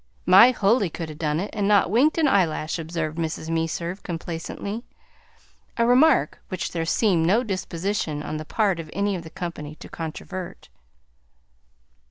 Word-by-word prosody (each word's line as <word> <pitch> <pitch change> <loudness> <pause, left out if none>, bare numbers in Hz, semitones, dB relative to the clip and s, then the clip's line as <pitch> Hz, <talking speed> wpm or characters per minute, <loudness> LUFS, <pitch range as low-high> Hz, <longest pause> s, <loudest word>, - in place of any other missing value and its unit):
"My 195 +7 +8
Huldy 210 -3 +2
could 160 0 -6
'a' - - -7
done 150 0 -1
it, 200 - -4
and 205 -2 0
not 205 -3 +4
winked 275 +9 +3
an 320 -2 +3
eyelash," 170 - +1
observed 160 -1 -3
Mrs. 160 0 -3
Meserve 165 +3 -2
complacently; 175 +6 -5 0.9
a 235 - +3
remark 250 - +4
which 185 - -3
there 165 -1 -2
seemed 175 -5 +2
no 220 +7 +3
disposition 185 -6 -3
on 155 - -4
the 155 - -5
part 195 -1 +1
of 160 -2 -7
any 200 0 0
of 175 - -4
the 165 - -10
company 160 -3 -6
to - - -11
controvert. 170 - -7
175 Hz, 160 wpm, -24 LUFS, 160-205 Hz, 0.9 s, My